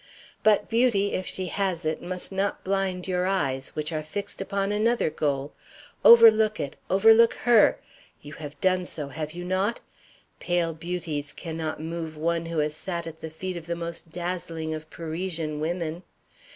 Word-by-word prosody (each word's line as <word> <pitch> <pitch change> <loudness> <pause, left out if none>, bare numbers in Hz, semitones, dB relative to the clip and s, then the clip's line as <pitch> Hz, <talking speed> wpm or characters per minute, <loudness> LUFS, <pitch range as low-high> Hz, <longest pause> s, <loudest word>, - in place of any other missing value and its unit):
But 210 -1 +4
beauty, 225 -4 +2
if 185 - -2
she 185 - -2
has 180 -3 -2
it, 155 0 -1
must 180 +1 -3
not 195 +1 -1
blind 190 -1 -1
your 180 0 0
eyes, 135 -9 -1
which 155 +1 -2
are 155 - -1
fixed 200 +7 -5
upon 195 +1 -1
another 215 -3 +1
goal. 145 -2 -1 0.5
Overlook 220 -2 +8
it; 140 - -4
overlook 225 +4 +6
her 235 -3 +5 0.4
you 145 +1 -11
have 145 -2 -9
done 185 -1 +2
so, 150 -5 -3
have 155 +2 -5
you 175 +1 -6
not? 190 +5 0 0.6
Pale 175 -2 0
beauties 160 -3 -4
cannot 160 0 -5
move 165 -1 -5
one 165 +1 -1
who 165 0 -4
has 150 0 0
sat 170 0 -4
at 160 -1 -9
the 160 - -5
feet 185 +4 -5
of 165 -1 -9
the 170 - -1
most 170 -1 -5
dazzling 170 -2 -4
of 155 0 -7
Parisian 165 -2 -3
women. 165 +1 -2
170 Hz, 165 wpm, -26 LUFS, 155-195 Hz, 0.6 s, Overlook